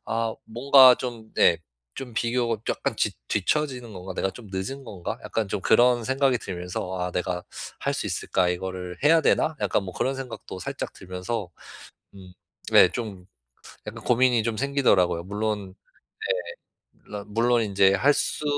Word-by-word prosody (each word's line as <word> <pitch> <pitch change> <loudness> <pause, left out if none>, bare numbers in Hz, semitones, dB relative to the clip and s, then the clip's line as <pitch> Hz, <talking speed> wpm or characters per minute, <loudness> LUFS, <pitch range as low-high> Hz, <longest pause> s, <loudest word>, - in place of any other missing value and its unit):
아 115 0 -1
뭔가 130 +2 +7
좀 120 -4 -7
네 85 - +4 0.4
좀 125 -4 -8
비교가 120 0 0
'약간 - - -2
지 - - +1 0.2
뒤처지는 125 +2 -1
건가?', 95 0 -8
'내가 95 - 0
좀 115 +2 -12
늦은 95 +9 -4
건가?' 100 -8 -6
약간 110 -2 -2
좀 100 - -3
그런 120 +3 +4
생각이 130 0 +2
들면서 90 -1 -5
'아. 90 0 -2
내가 90 0 -2 0.4
할 - - 0
수 - - -3
있을까? 90 -2 0
이거를 90 0 -4
해야 160 +2 +6
되나?' 155 0 +2
약간 - - +1
뭐 95 - -7
그런 135 +8 -1
생각도 130 -7 -7
살짝 - - -5
들면서 95 +2 -5 0.6
음 95 -2 -13 0.4
네 - - +8
좀 100 -6 -6 0.6
약간 - - -7
고민이 125 -1 +3
좀 115 -1 -2
생기더라고요. 120 -11 +2
물론 100 -1 -3 1.0
예 - - -41
물론 105 -1 -7
물론 120 +1 +3
이제 100 -2 +3
할 135 +9 +4
수 145 +1 -1
110 Hz, 290 characters per minute, -25 LUFS, 95-125 Hz, 1.0 s, 네